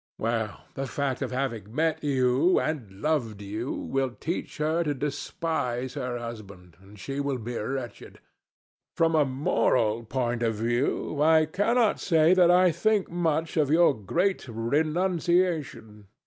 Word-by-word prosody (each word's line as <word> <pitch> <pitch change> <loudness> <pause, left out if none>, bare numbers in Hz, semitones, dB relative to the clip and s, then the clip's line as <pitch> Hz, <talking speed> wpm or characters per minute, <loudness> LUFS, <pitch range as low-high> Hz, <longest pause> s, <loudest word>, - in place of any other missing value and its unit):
Well, 110 -2 -2
the 135 0 -4
fact 135 0 -2
of - - -2
having 120 -5 -3
met 160 0 0
you, 135 +4 +3
and 135 -11 -3
loved 125 -10 0
you, 105 +5 -4
will 135 -1 -1
teach 160 +8 -5
her 155 +3 +1
to 145 -3 -1
despise 140 -3 -3
her 125 -3 -3
husband, 100 -7 -9
and 100 +2 -16
she 135 +7 -5
will 140 -2 -1
be 120 +1 -6
wretched. 125 +2 -5 0.8
From 165 0 +2
a 155 -2 +4
moral 125 -4 +1
point 120 0 -2
of 115 -2 0
view, 120 +6 -1
I 160 0 +5
cannot 215 +7 +1
say 165 -1 +4
that 180 -2 +5
I 180 0 +5
think 215 +2 0
much 165 -2 -1
of 150 -3 +2
your 165 0 +5
great 170 - -1
renunciation. 155 - -1
135 Hz, 145 wpm, -27 LUFS, 120-160 Hz, 0.8 s, I